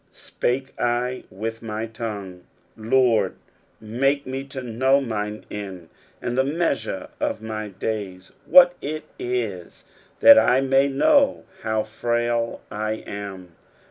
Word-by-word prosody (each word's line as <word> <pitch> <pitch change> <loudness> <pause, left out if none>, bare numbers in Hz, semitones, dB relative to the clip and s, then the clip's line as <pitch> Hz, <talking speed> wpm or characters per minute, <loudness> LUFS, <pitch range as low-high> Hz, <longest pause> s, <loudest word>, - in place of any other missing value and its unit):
spake 130 +2 -3
I 120 +1 -1
with 110 +4 -5
my 110 -1 -4
tongue, 105 -6 -6 0.3
4 110 - -11
Lord, 115 -5 +3 0.4
make 135 +6 0
me 130 +1 -4
to 135 -1 -7
know 130 +4 +2
mine 105 -4 -4
end, 95 -5 -7 0.3
and 120 - -3
the 130 - +3
measure 140 - -1
of 110 - -2
my 110 -1 -4
days, 100 -2 -5 0.2
what 180 -1 +8
it 155 +2 -4 0.2
is; 375 0 -4 0.3
titat 285 0 +9
I 125 - +4
may 135 +1 +3
know 280 - +3 0.2
how 110 -1 0
frail 120 +1 -1
I 110 +1 -2
am. 95 -3 -7
115 Hz, 130 wpm, -23 LUFS, 105-135 Hz, 0.4 s, titat